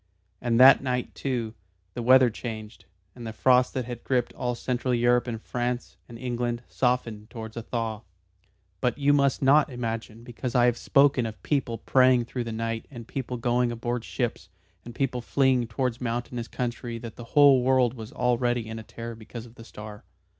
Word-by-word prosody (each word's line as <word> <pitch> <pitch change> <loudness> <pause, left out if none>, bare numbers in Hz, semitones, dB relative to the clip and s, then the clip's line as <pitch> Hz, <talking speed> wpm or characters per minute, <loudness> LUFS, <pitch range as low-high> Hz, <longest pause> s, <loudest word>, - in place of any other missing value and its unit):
And 120 -1 +1
that 130 +2 +9
night, 125 -2 -2
too, 120 -5 -3 0.4
the 120 - -4
weather 130 0 +6
changed, 110 -1 -7 0.3
and 120 -2 -8
the - - -4
frost 125 +3 +3
that 130 -2 -1
had 120 -1 -7
gripped 125 -2 0
all 125 -1 -2
Central 125 +1 -1
Europe 120 +1 +3
and 115 -2 -3
France 120 +2 -3
and 115 - -9
England 120 -1 -3
softened 120 -4 -1
towards 110 -2 -8
a 115 - -4
thaw. 115 -2 -3 0.8
But 125 - 0
you 145 0 +3
must 140 -1 +2
not 145 +3 +5
imagine 115 -2 -5
because 120 +1 -6
I 120 -1 +5
have 120 -1 +3
spoken 135 -1 +3
of 110 -1 -9
people 135 -6 -1
praying 125 +1 +4
through 120 0 -4
the 115 - -4
night 115 0 -3
and 120 -4 -10
people 125 -2 -4
going 120 +1 +1
aboard 120 0 -3
ships 115 -7 -3 0.3
and 120 0 -10
people 130 -2 -1
fleeing 130 -1 +2
towards 120 +2 -2
mountainous 120 0 -3
country 120 -1 -4
that 115 -1 -8
the 120 - -9
whole 140 -3 +7
world 130 -1 +3
was 110 -3 -9
already 120 -1 0
in 110 0 -6
a - - -8
terror 115 +1 -7
because 115 +1 -9
of 115 - -15
the 115 - -13
star. 105 -2 -10
120 Hz, 185 wpm, -26 LUFS, 115-125 Hz, 0.8 s, that